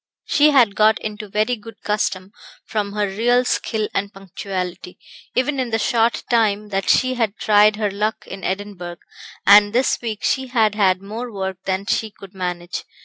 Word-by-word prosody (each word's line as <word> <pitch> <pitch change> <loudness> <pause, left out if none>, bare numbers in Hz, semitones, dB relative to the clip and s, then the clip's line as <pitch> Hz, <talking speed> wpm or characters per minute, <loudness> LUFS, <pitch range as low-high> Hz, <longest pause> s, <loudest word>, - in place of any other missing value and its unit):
She 295 +1 +4
had 250 -8 +4
got 215 +1 +4
into 210 -1 -6
very 215 +5 0
good 225 0 -13
custom, 200 -2 -2 0.3
from 205 -2 -3
her 210 0 0
real 240 +5 +2
skill 220 -3 -1
and 200 0 -2
punctuality, 185 -2 -6 0.4
even 270 +2 0
in 255 -2 -1
the 225 - 0
short 230 0 +1
time 210 -3 +1
that 195 -1 -2
she 255 0 +3
had 225 -5 -1
tried 210 0 +4
her 210 -2 -1
luck 210 +2 -2
in 190 0 -9
Edinburgh; 190 -3 -4 0.5
and 205 +1 +7
this 255 +3 +2
week 220 -3 -5
she 265 0 0
had 225 -4 +2
had 190 -3 +2
more 230 +4 -6
work 190 -2 -4
than 190 +1 -1
she 220 +2 0
could 195 -2 -14
manage. 180 -2 -4
210 Hz, 175 wpm, -20 LUFS, 195-225 Hz, 0.5 s, and